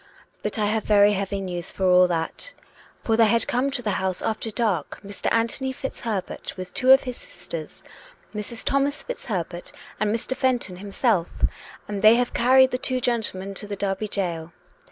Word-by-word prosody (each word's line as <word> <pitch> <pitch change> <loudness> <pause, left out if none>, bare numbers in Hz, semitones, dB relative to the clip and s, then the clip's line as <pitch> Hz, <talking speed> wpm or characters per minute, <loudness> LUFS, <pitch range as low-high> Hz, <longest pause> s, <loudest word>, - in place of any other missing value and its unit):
But - - -2
I 210 - +1
have 215 +1 0
very 205 -1 +5
heavy 200 0 -2
news, 175 -3 -4
for 190 - -2
all 180 0 +6
that; 170 - -3 0.5
for 225 - +2
there 225 -1 +5
had 230 +2 +3
come 255 +3 +1
to 265 -3 -2
the 210 - 0
house 190 -1 -1
after 225 0 -2
dark 215 -4 -1
Mr. 200 0 -3
Anthony 235 +4 +1
FitzHerbert, 225 -10 -5
with 185 -1 -7
two 255 -1 +1
of 270 - +8
his 250 -2 -5
sisters, - - -9 0.5
Mrs. 215 +2 -3
Thomas 275 +2 +1
Fitz - - -6
Herbert 175 -4 -4 0.3
and 215 0 +1
Mr. 230 +3 -2
Fenton 250 -9 0
himself, 200 -1 0 0.6
and 205 -1 -4
they 215 +2 +8
have 245 0 0
carried 260 +2 +5
the 250 - -1
two 255 -1 0
gentlemen 215 -6 -1
to 205 +2 -3
the 205 - -4
Derby 200 +1 -2
gaol. 170 -5 -3
215 Hz, 180 wpm, -24 LUFS, 190-245 Hz, 0.6 s, of